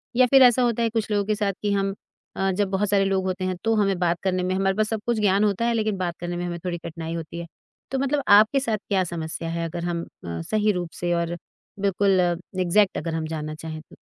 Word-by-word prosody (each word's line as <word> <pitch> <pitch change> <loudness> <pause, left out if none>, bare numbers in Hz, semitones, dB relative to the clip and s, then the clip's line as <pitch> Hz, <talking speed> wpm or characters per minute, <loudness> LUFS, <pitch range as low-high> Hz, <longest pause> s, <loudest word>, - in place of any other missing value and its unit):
या 255 0 +6
फिर 270 +1 +6
ऐसा 250 0 +6
होता 235 -1 +1
है 230 - +2
कुछ 225 -1 -2
लोगों 205 -1 +1
के 215 0 0
साथ 200 -2 0
कि 205 -1 0
हम 195 0 0 0.4
अ, 195 0 +1
जब 195 +1 0
बहुत 195 +1 0
सारे 200 -1 +3
लोग 190 -1 0
होते 185 0 -2
हैं, 185 -1 -1
तो 225 0 +2
हमें 195 -3 +2
बात 175 -1 +1
करने 185 -1 0
में 185 +1 0
हमारे 195 0 +1
पास 215 0 +1
सब 220 -2 -2
कुछ 235 -2 0
ज्ञान 200 0 +3
होता 210 +2 +1
है, 235 - +2
लेकिन 215 -3 0
बात 175 -2 -3
करने 175 0 -4
में 175 - -3
हमें 175 -1 -4
थोड़ी 175 -1 -2
कठिनाई 165 0 -6
होती 165 +1 -6
है। 170 - -5 0.5
तो 265 - 0
मतलब 280 +1 0
आपके 215 +6 +6
साथ 225 -5 -1
क्या 190 -2 +2
समस्या 165 -1 -4
है? 165 0 -2
अगर 170 +1 -5
हम 170 -1 -2
अ, 85 -1 -7
सही 215 - +1
रूप 175 -3 -3
से 175 0 +1
और 170 0 -1 0.4
बिल्कुल 195 -1 +2 0.4
एग्ज़ैक्ट 190 +3 +3
अगर 165 -1 -3
हम 160 -1 -2
जानना 155 -1 -4
चाहें 155 -1 -7
तो? - - -18
190 Hz, 255 wpm, -24 LUFS, 170-210 Hz, 0.5 s, या